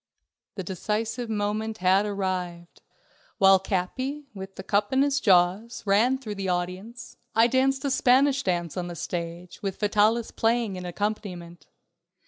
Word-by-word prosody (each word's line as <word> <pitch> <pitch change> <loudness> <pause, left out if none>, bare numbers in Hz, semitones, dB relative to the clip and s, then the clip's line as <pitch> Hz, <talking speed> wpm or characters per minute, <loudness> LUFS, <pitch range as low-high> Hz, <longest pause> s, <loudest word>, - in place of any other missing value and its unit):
The 190 - -4
decisive 220 +6 -3
moment 215 +1 -2
had 190 +2 +3
arrived. 180 -4 -4 0.6
While 195 -1 +6
Capi, 255 +10 -3
with 195 -1 -9
the 190 - -7
cup 205 +1 +1
in 265 +1 +4
his 285 0 +1
jaws, 190 +3 +2
ran 220 +6 +3
through 230 -6 -6
the 195 -2 -3
audience, 185 +7 -4 0.2
I 225 +1 +6
danced 265 +3 +1
a 280 - 0
Spanish 270 +2 +4
dance 175 - -2
on 180 -2 -3
the 175 - -6
stage, 170 +1 -6
with 195 -2 -4
Vitalis 215 +2 +2
playing 225 -3 0
an 180 -1 -6
accompaniment. 180 -3 -5
205 Hz, 145 wpm, -26 LUFS, 180-235 Hz, 0.6 s, While